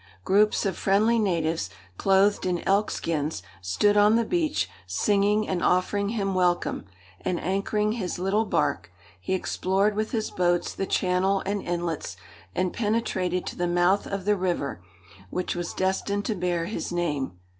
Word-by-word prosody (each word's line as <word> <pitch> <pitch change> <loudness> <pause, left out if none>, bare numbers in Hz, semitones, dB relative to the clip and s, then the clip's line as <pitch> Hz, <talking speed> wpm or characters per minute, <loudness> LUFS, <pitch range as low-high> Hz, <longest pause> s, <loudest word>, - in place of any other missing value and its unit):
Groups 210 - +3
of 195 - 0
friendly 215 +4 +3
natives, 165 -5 0 0.3
clothed 195 - +3
in 175 -2 -2
elk 200 +2 +3
skins, 155 - -2 0.2
stood 205 - +2
on 210 +1 +5
the 230 0 +2
beach, 315 +1 0 0.2
singing, 205 - +2
and 185 -2 -1
offering 200 +3 +2
him 200 -3 -1
welcome, 180 - +1 0.4
and, 175 - -1
anchoring 210 +3 0
his 210 -6 -3
little 195 +5 +1
bark, 150 - 0 0.3
he 190 - -1
explored 195 +2 0
with 215 +1 -1
his 220 -3 -2
boats 175 -1 +1
the 195 - -3
channel 190 +1 +1
and 200 +1 -1
inlets, 170 - -3 0.4
and 185 -1 0
penetrated 205 -5 -1
to - - -5
the 175 - -1
mouth 175 +3 +2
of 195 -2 -4
the 210 0 +3
river 175 - -2 0.5
which 180 - -2
was 175 -1 -3
destined 195 +2 -1
to 220 - 0
bear 175 -3 -1
his 210 - -4
name. 150 - -1
190 Hz, 155 wpm, -26 LUFS, 175-205 Hz, 0.5 s, on